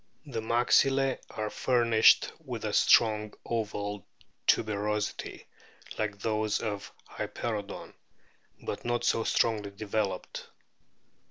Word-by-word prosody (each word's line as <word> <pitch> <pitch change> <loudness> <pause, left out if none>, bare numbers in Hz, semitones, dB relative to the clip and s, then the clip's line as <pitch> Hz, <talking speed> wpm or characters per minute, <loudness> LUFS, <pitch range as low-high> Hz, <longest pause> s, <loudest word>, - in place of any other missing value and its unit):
The 130 -6 -4
maxillae 130 +3 +3
are 110 -1 -4
furnished 115 -3 +4
with - - -5
a - - -2
strong 110 -2 +4
oval 105 -3 -3 0.4
tuberosity 105 -1 0 0.5
like 105 -2 -1
those 110 0 0
of 105 -3 -4 0.2
Hyperoodon, 105 -4 -5 0.7
but - - -5
not 120 0 -1
so 115 -1 +2
strongly 105 -3 +1
developed. 100 0 -3
110 Hz, 95 wpm, -29 LUFS, 105-115 Hz, 0.7 s, furnished